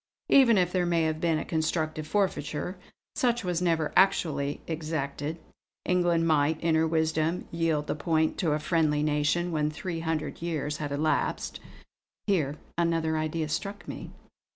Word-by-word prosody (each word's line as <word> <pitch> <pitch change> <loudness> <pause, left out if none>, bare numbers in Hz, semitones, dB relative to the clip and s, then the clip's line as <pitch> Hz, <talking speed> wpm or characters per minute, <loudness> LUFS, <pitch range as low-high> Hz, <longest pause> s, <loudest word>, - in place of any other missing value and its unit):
Even 245 -6 +6
if 180 -1 +2
there 180 -1 +1
may 170 -1 +2
have 155 0 -1
been 165 -2 +2
a - - -3
constructive 155 -1 -1
forfeiture, 180 -2 -1 0.4
such 240 -2 +1
was 180 -1 -1
never 165 -3 +1
actually 150 -7 +2
exacted; 155 -1 -3 0.5
England 175 -2 +2
might, 155 -1 +2
in 165 -1 +1
her 160 0 +3
wisdom, 160 +1 0
yield 165 -3 0
the - - -1
point 160 +1 +1
to 160 -5 +1
a - - +2
friendly 155 -2 +1
nation, 150 +4 +1
when 150 -2 +1
three 165 +2 -4
hundred 160 -3 -3
years 150 -3 -2
had 145 -1 -4
elapsed." 150 +2 -1 0.7
Here 155 -8 +1 0.2
another 165 -2 +1
idea 155 0 -1
struck 200 +6 -4
me. - - -7
160 Hz, 155 wpm, -28 LUFS, 155-170 Hz, 0.7 s, Even